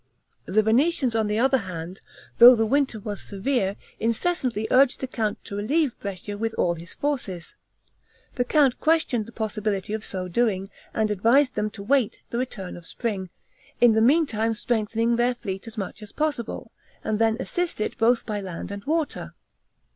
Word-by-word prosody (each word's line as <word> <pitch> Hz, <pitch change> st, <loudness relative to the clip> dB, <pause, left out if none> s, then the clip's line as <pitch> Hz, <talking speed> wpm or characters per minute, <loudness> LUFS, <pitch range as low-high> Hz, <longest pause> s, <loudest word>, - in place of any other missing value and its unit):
The 215 Hz, +3 st, +3 dB
Venetians, 255 Hz, +2 st, +2 dB
on 220 Hz, -1 st, +1 dB
the 210 Hz, +1 st, 0 dB
other 265 Hz, +3 st, +3 dB
hand, 180 Hz, -2 st, -7 dB, 0.4 s
though 245 Hz, +1 st, +11 dB
the 225 Hz, -1 st, +1 dB
winter 270 Hz, -1 st, +1 dB
was 205 Hz, -1 st, -5 dB
severe, 200 Hz, -1 st, -1 dB, 0.2 s
incessantly 230 Hz, -2 st, 0 dB
urged 260 Hz, 0 st, +5 dB
the -, -, -2 dB
count 220 Hz, -5 st, -3 dB
to 200 Hz, -, -6 dB
relieve 275 Hz, +6 st, 0 dB
Brescia 200 Hz, +1 st, -6 dB
with 225 Hz, 0 st, -2 dB
all 175 Hz, -, +2 dB
his 170 Hz, 0 st, -9 dB
forces. 245 Hz, -, -3 dB, 0.8 s
The 245 Hz, -, 0 dB
count 270 Hz, -1 st, +3 dB
questioned 310 Hz, -9 st, +1 dB
the -, -, -10 dB
possibility 210 Hz, -3 st, -2 dB
of 220 Hz, 0 st, -3 dB
so 185 Hz, -3 st, -4 dB
doing, 195 Hz, -1 st, 0 dB, 0.2 s
and 220 Hz, -2 st, 0 dB
advised 245 Hz, +7 st, +3 dB
them 210 Hz, -, -1 dB
to 205 Hz, -1 st, -9 dB
wait 245 Hz, -1 st, +1 dB
the 235 Hz, -, -1 dB
return 200 Hz, -8 st, -4 dB
of 175 Hz, -, -11 dB
spring, 200 Hz, -6 st, -3 dB, 0.5 s
in 240 Hz, -1 st, +7 dB
the 220 Hz, 0 st, +3 dB
meantime 230 Hz, -5 st, +3 dB
strengthening 225 Hz, +1 st, 0 dB
their 245 Hz, +1 st, +2 dB
fleet 195 Hz, -3 st, -6 dB
as 225 Hz, -, -9 dB
much 200 Hz, +2 st, -5 dB
as 210 Hz, -1 st, -10 dB
possible, 300 Hz, -7 st, -3 dB, 0.3 s
and 215 Hz, -1 st, -1 dB
then 225 Hz, 0 st, +3 dB
assist 350 Hz, +4 st, -2 dB
it 215 Hz, -, -2 dB
both 235 Hz, +1 st, +3 dB
by 210 Hz, -2 st, -3 dB
land 185 Hz, 0 st, -6 dB
and 200 Hz, 0 st, -6 dB
water. 315 Hz, 0 st, -2 dB
225 Hz, 175 wpm, -25 LUFS, 205-255 Hz, 0.8 s, though